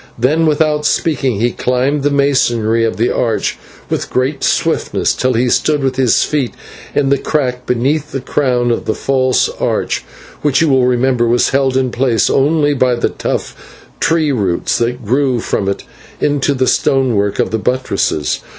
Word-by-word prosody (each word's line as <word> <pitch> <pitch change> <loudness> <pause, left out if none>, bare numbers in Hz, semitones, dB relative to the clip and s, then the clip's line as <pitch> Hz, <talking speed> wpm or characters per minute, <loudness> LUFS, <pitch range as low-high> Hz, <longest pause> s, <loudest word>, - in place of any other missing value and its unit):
Then, 150 +7 +2
without 150 0 +1
speaking, 135 -9 0
he 120 +2 +1
climbed 130 +5 0
the 145 - +1
masonry 120 -5 +1
of 115 - -1
the 115 +3 +1
archway 115 -3 -1 0.3
with - - -3
great 135 +3 -1
swiftness, - - 0
till 130 0 0
he 120 +2 +1
stood 145 +3 +1
with 130 -1 0
his 130 -4 +3
feet 140 -5 -2 0.4
in 140 -2 +2
the 140 -1 +2
crack 125 -4 -2
beneath 140 +5 0
the 135 - -3
crown 125 -3 0
of 115 - -2
the 110 - -2 0.6
arch, - - -1 0.4
which 145 -2 +2
you 160 - +2
will 130 -2 +3
remember 125 -1 +1
was 120 +1 +2
held 135 -1 +1
in 130 -1 0
place 120 -4 +1
only 145 +1 +2
by 130 -2 +2
the 120 - 0
tough - - -6
tree 160 -2 +1
roots, 100 -9 -1
that 120 0 -2
grew 130 +2 +1
from 100 -3 -2
it 100 - -3 0.4
into 145 -1 +1
the 130 0 +1
stonework 120 -8 +1
of - - 0
the 110 - -1
buttresses. 125 - -1
130 Hz, 170 wpm, -15 LUFS, 120-140 Hz, 0.6 s, his